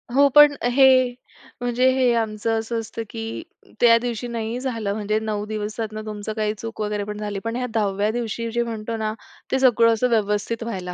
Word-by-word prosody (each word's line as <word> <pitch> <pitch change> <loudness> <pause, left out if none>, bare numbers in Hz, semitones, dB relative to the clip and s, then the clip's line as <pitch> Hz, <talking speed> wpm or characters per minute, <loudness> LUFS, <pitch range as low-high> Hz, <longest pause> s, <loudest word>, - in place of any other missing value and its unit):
हो, 280 0 +6
पण 295 -1 +8 0.2
हे 270 +2 +4 0.8
म्हणजे 245 +1 +2
हे 250 -2 +3
आमचं 225 0 -1
असं 225 +1 -3
असतं 225 +1 -6
की 225 - -6 0.6
त्या 230 -1 +6
दिवशी 245 0 -3
नाही 230 +1 -3
झालं 225 -6 -2
म्हणजे 215 0 -1
9 210 -1 -3
दिवसातनं 215 0 -4
तुमचं 210 0 -5
काही 215 -1 -1
चूक 225 0 -7
वगैरे 210 -1 -2
पण 210 0 -6
झाली. 205 -1 -4
पण 230 +3 -4
ह्या 250 0 -2
10व्या 205 -1 0
दिवशी 230 0 -3
जे 235 0 0
म्हणतो 225 0 -4
ना, 215 0 -2 0.4
ते 265 - +2
सगळं 230 -3 +5
असं 250 +3 +1
व्यवस्थित 215 +1 0
व्हायला 185 -6 -5
225 Hz, 185 wpm, -22 LUFS, 210-235 Hz, 0.8 s, पण